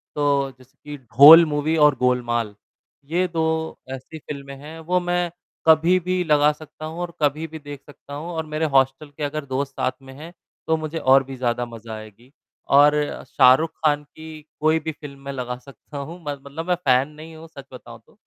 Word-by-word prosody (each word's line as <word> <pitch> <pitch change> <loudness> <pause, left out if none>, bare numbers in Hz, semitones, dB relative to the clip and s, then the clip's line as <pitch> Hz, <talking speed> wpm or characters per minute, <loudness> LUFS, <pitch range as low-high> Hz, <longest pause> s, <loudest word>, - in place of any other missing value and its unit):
तो 140 -2 +1
जैसे 130 0 -22
कि 145 0 -8
ढोल 140 +7 +8
मूवी 150 +1 -1
और 145 -2 +4
गोलमाल, 120 -3 0 0.5
ये 175 +5 0
2 170 -2 -3 0.5
ऐसी 135 +4 -9
फ़िल्में 140 -2 -8
हैं, 155 +4 -11
वो 175 +3 0
मैं 175 -1 -1 0.4
कभी 165 +3 +5
भी 180 +1 -1
लगा 150 -2 +3
सकता 155 +1 -11
हूँ 160 +2 -7
और 175 -1 -5
कभी 150 +2 0
भी 160 0 -9
देख 145 -2 -10
सकता 145 -1 -14
हूँ 150 +4 -6
और 160 -2 -4
मेरे 155 +1 -2
हॉस्टल 135 +3 +2
के 155 - -5
अगर 145 +1 -3
दोस्त 135 +1 -3
साथ 130 - -1
में 135 0 -13
हैं 165 +3 -10 0.4
तो 160 - +2
मुझे 155 +1 -5
और 135 -2 +4
भी 135 0 -9
ज़्यादा 120 -1 -1
मज़ा 115 -1 -10
आएगी 110 +4 -13 0.4
और 145 +1 +6 0.3
शाहरुख़ 130 +7 +4
खान 150 -1 +2
की 155 +1 -12 0.2
कोई 155 +1 +2
भी 160 +1 -4
फ़िल्म 145 -2 -12
मैं 140 - -4
लगा 125 -2 -5
सकता 140 +3 -13
हूँ 160 +6 -7
म - - -21
मतलब 140 +3 -7
मैं 180 - +2
फ़ैन 130 +1 +3
नहीं 155 +2 -12
हूँ 160 +1 -12
सच 140 -4 -12
बताऊँ 120 -2 -11
तो, - - -25
145 Hz, 200 wpm, -22 LUFS, 135-160 Hz, 0.5 s, ढोल